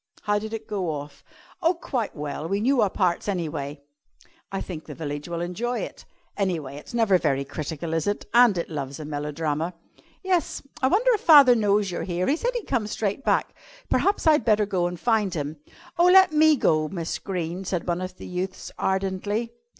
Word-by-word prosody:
"How 205 -1 +1
did 215 +1 -6
it 225 -1 -5
go 190 -5 -2
off?" 145 -2 -6 0.4
"Oh, 345 +1 +3
quite 250 -9 -3
well. 150 +1 -4
We 200 +1 0
knew 250 +3 +3
our 205 - +3
parts, 180 -2 0
anyway." 150 -7 -3 0.7
"I 195 - -2
think 160 -4 -7
the 150 - -7
village 145 +1 -5
will 170 0 -3
enjoy 230 +8 -2
it." - - -7 0.3
"Anyway, 165 -9 -2
it's 150 - -9
never 215 -6 +4
very 140 -4 0
critical, 155 +3 -5
is 165 +1 0
it? 205 - -1
And 235 -5 +6
it 170 - -2
loves 140 -3 -5
a 155 - -6
melodrama." 150 +3 -3 0.5
"Yes. 370 -3 0 0.2
I 260 - +4
wonder 445 - +3
if 425 - -1
father 285 -6 +8
knows 205 -3 +2
you're 175 - -3
here. 180 0 -1
He 280 - +2
said - - -2
he'd 475 - -3
come 215 -3 -1
straight 210 +4 -2
back. - - +1 0.4
Perhaps 400 -1 +2
I'd 305 -5 +5
better 215 -1 +3
go 180 -3 0
and 175 -1 -6
find 215 -5 +1
him." 150 0 -4 0.4
"Oh, 350 - +6
let 380 -1 +7
me 310 0 +5
go, 155 - +2
Miss 170 -1 -4
Greene," 180 -1 -4
said 180 -2 -2
one 175 +1 0
of 185 0 -5
the - - -9
youths 185 +1 -5
ardently. 195 +4 -1
190 Hz, 195 wpm, -25 LUFS, 160-230 Hz, 0.7 s, father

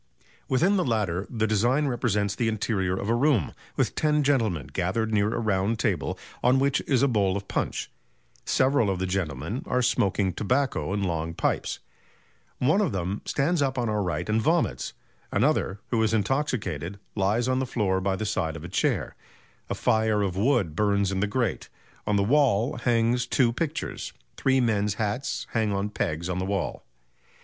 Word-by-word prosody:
Within 175 +10 +3
the 185 - +2
latter 100 -6 -1
the 110 -2 0
design 120 +7 +2
represents 105 -6 0
the 115 - -1
interior 100 -4 0
of 100 - -3
a 115 - +2
room, 120 - +2 0.2
with - - +1
ten 150 -1 +2
gentlemen 110 - +1
gathered 110 +5 -1
near 105 0 +2
a - - -2
round 105 0 +1
table - - -1 0.3
on 125 +2 +5
which 140 +1 +2
is 135 -2 +3
a - - +5
bowl 100 -6 +1
of 100 0 -7
punch; - - -2 0.6
several 130 -5 +2
of 95 - 0
the 95 - -1
gentlemen 90 - -2
are 125 0 +1
smoking 100 -6 +1
tobacco 125 - 0
in 100 0 -1
long 85 -2 -2
pipes; - - -1 0.8
one 155 +11 +3
of 205 - +1
them 95 +2 -2
stands 155 +4 +1
up 135 -1 0
on 120 -2 0
our 105 -1 0
right 90 -3 -2
and 110 +1 +1
vomits; 155 - 0 0.4
another, 105 -4 +1
who 115 -2 +2
is 110 0 +2
intoxicated, 100 - -1 0.2
lies 105 +4 +1
on 130 0 +1
the 130 - -1
floor 95 -6 0
by 95 0 0
the 110 - -3
side 85 -6 -1
of 80 - -8
a - - -5
chair; 90 - 0 0.5
a - - -1
fire 110 -2 +2
of 95 -3 -2
wood 100 - +1
burns 100 -1 +2
in 95 - -1
the 105 - +1
grate; 115 -1 -1 0.4
on 105 - +2
the 100 - +3
wall 125 0 +2
hangs 120 +1 +1
two 125 -2 +2
pictures... 160 +4 -3 0.2
three 135 0 +2
men's 105 -4 +1
hats 110 +5 -2
hang 110 -2 +1
on 100 +1 -1
pegs 85 -5 -2
on 90 0 -2
the - - -1
wall." 100 -1 -2
110 Hz, 180 wpm, -26 LUFS, 95-125 Hz, 0.8 s, on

